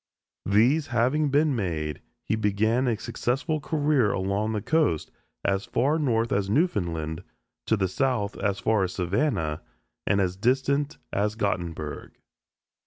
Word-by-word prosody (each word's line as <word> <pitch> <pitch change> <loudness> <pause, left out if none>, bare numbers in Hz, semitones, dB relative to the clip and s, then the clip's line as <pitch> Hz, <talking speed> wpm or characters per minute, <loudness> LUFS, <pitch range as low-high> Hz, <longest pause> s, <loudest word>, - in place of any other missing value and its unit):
These 120 +10 +3
having 130 +6 +2
been 145 0 +3
made, 80 - -2 0.2
he - - 0
began 110 +4 +1
a 115 -3 +1
successful 135 +9 -2
career 145 -7 +1
along 100 +3 -1
the 105 -2 -2
coast 155 - +1 0.3
as 95 0 +1
far 145 +6 +1
north 115 -5 +1
as 100 -1 0
Newfoundland, 85 - 0 0.5
to 110 - +3
the 95 -1 +1
south 110 0 0
as 100 0 0
far 110 -2 +2
as 90 - -2
Savannah 90 - 0 0.5
and 100 - +3
as 90 -2 0
distant 135 +6 +1 0.2
as 105 +2 0
Gottenburg. 85 -8 -3
110 Hz, 135 wpm, -26 LUFS, 95-135 Hz, 0.5 s, These